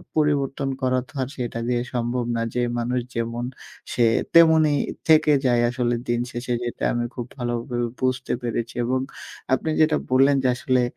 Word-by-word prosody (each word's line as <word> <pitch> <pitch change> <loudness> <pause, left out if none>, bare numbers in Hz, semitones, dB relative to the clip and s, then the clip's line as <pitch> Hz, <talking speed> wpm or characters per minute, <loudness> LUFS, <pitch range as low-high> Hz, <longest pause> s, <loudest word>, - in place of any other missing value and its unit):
পরিবর্তন 140 -2 +1
করাতো 130 +2 0
আর 130 - -1
সেটা 120 -2 -4
দিয়ে 120 -1 +1
সম্ভব 120 0 -1
না। 115 - -1
যে 125 - +1 0.2
মানুষ 125 +2 0 0.2
যেমন, 115 +1 -2 0.5
সে 120 - +2 0.3
তেমনই 160 -3 +6 0.3
থেকে 155 -1 +5
যায়। 120 -2 +3
আসলে 120 -1 0
দিন 120 0 +1
শেষে 120 +1 -3
যেটা 120 - -5
আমি 120 0 -1
খুব 120 - -4
ভালোভাবে 120 0 -2
বুঝতে 130 0 -1
পেরেছি 115 0 -3
এবং 130 +2 +1 0.5
আপনি 145 +4 0
যেটা 155 -1 +4
বললেন। 135 +2 +5
যে - - +3
আসলে 125 0 +1
125 Hz, 160 wpm, -23 LUFS, 120-135 Hz, 0.5 s, তেমনই